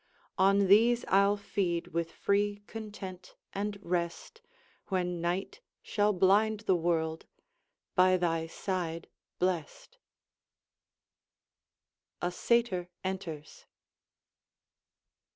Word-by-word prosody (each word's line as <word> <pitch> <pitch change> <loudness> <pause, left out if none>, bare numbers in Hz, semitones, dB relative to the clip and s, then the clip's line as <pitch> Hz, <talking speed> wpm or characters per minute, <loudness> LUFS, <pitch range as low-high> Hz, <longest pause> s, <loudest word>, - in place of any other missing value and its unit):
On 195 +1 +5
these 230 +5 +5
I'll 200 +1 +4
feed 180 -4 -2
with 170 -1 -2
free 205 +2 0
content 200 -5 -8 0.2
and 205 +1 -3
rest, 175 - -3 0.5
When 180 -3 -1
night 180 - -2 0.2
shall 210 0 +2
blind 205 +3 +3
the 195 -4 +2
world, 165 -2 -1 0.7
by 185 0 +5
thy 165 -2 0
side 170 -2 -3 0.3
blessed 175 -4 -3 2.2
[A 175 - -1
Satyr 185 -3 +1
enters. 175 -6 -6
185 Hz, 85 wpm, -30 LUFS, 175-205 Hz, 2.2 s, On